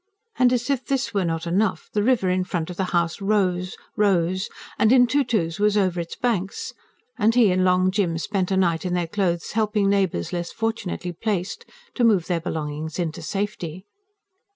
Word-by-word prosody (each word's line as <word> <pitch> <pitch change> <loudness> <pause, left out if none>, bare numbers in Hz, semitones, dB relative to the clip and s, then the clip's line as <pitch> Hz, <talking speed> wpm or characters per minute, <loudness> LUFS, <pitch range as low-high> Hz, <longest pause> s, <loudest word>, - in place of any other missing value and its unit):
As 250 +1 +3
if 265 -2 0
this 265 -4 -1
were 200 -2 +1
not 165 0 -2
enough, 190 +4 0
the 210 - +2
river 230 -3 +2
in 185 0 +1
front 175 -2 -3
of - - -7
the 190 - 0
house 170 0 0
rose 185 -3 0 0.2
rose, 185 -2 +1 0.3
and 220 - +4
in 250 -1 +7
two 285 +4 +2
twos 175 -8 -1
was 210 0 +3
over 185 -3 +1
its 170 0 -5
banks 240 - -2 0.5
and 225 +1 +3
he 230 -6 +5
and 185 0 +2
Long 185 0 +3
Jim 185 -4 0
spent 190 +2 -1
a 190 - +1
night 170 -3 +2
in 180 -1 -1
their 175 -1 0
clothes, 175 -1 -1
helping 210 -2 +1
neighbours 190 - 0
less 175 -1 -3
fortunately 225 -6 -3
placed 205 - -3 0.3
to 245 - 0
move 205 -7 +4
their 175 -2 -1
belongings 155 -1 -4
into 170 -3 -3
safety. 185 -1 -4
190 Hz, 185 wpm, -23 LUFS, 175-215 Hz, 0.5 s, in